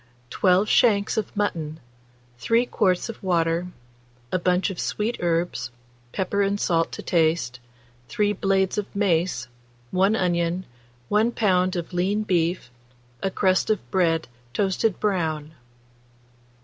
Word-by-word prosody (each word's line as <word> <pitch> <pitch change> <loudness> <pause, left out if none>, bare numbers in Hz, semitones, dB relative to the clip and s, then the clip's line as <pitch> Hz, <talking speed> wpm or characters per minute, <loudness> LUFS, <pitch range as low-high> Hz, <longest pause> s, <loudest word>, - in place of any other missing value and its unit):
12 185 +2 +3
shanks 210 -3 +3
of 215 -2 -3
mutton, 160 -6 -2 0.6
3 230 - +2
quarts 185 -5 +1
of 230 - -8
water, 170 -2 +1 0.6
a 185 - +1
bunch 180 +2 +1
of 185 - -8
sweet 220 +3 -1
herbs, 170 -6 -1 0.4
pepper 200 +1 -1
and 200 +1 +1
salt 165 -4 +1
to - - -7
taste, 160 -7 +1 0.5
3 210 0 +1
blades 195 0 +1
of 205 - -6
mace, 175 - +1 0.4
1 195 +4 +3
onion, 175 -1 0 0.4
1 220 +3 +3
lb. 185 -3 +2
of 175 +1 -4
lean 195 +4 +1
beef, 175 - 0 0.5
a 195 - 0
crust 190 0 +1
of 215 -3 -1
bread 165 -4 +2 0.3
toasted 200 +1 +1
brown. 160 -6 -1
185 Hz, 125 wpm, -24 LUFS, 170-205 Hz, 0.6 s, 12